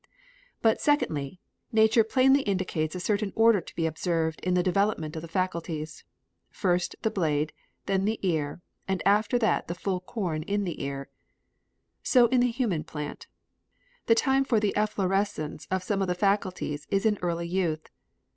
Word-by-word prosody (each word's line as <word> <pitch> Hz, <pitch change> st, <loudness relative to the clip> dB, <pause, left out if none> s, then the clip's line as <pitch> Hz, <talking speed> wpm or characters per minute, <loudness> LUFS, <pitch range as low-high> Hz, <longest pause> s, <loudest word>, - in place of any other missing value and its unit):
But, 225 Hz, -1 st, +3 dB
secondly, 175 Hz, -, 0 dB, 0.3 s
nature 220 Hz, +1 st, +5 dB
plainly 265 Hz, +5 st, +4 dB
indicates 185 Hz, -, -1 dB
a -, -, -3 dB
certain 205 Hz, +2 st, 0 dB
order 225 Hz, -3 st, +5 dB
to -, -, -13 dB
be 165 Hz, -, 0 dB
observed 160 Hz, 0 st, -1 dB
in 180 Hz, 0 st, 0 dB
the 180 Hz, -, +3 dB
development 185 Hz, -4 st, 0 dB
of 160 Hz, -, -4 dB
the 170 Hz, -, -8 dB
faculties. 165 Hz, -3 st, -3 dB, 0.5 s
"First 180 Hz, -2 st, 0 dB
the 220 Hz, -, +1 dB
blade, 155 Hz, -4 st, 0 dB, 0.3 s
then 195 Hz, 0 st, +1 dB
the 220 Hz, +1 st, 0 dB
ear, 160 Hz, -2 st, -1 dB, 0.2 s
after 205 Hz, +4 st, +2 dB
that 225 Hz, -2 st, +1 dB
the 170 Hz, -, -4 dB
full 185 Hz, 0 st, -2 dB
corn 180 Hz, -5 st, -3 dB
in 200 Hz, +5 st, -1 dB
the 175 Hz, -4 st, -4 dB
ear." 140 Hz, 0 st, -4 dB, 0.9 s
So 250 Hz, -3 st, +5 dB
in 255 Hz, -, +3 dB
the 245 Hz, 0 st, +3 dB
human 230 Hz, -, -1 dB
plant. 150 Hz, -1 st, -7 dB, 0.8 s
The 230 Hz, -, +6 dB
time 270 Hz, +3 st, +3 dB
for 235 Hz, -5 st, +2 dB
the 210 Hz, -2 st, 0 dB
efflorescence 195 Hz, -7 st, -1 dB
of 185 Hz, 0 st, -1 dB
some 195 Hz, +1 st, -1 dB
of 190 Hz, -, 0 dB
the 180 Hz, -, 0 dB
faculties 185 Hz, -6 st, -1 dB
is 195 Hz, +2 st, +1 dB
in 210 Hz, -2 st, +2 dB
early 170 Hz, -1 st, -1 dB
youth. 170 Hz, -3 st, -1 dB
185 Hz, 165 wpm, -27 LUFS, 165-215 Hz, 0.9 s, The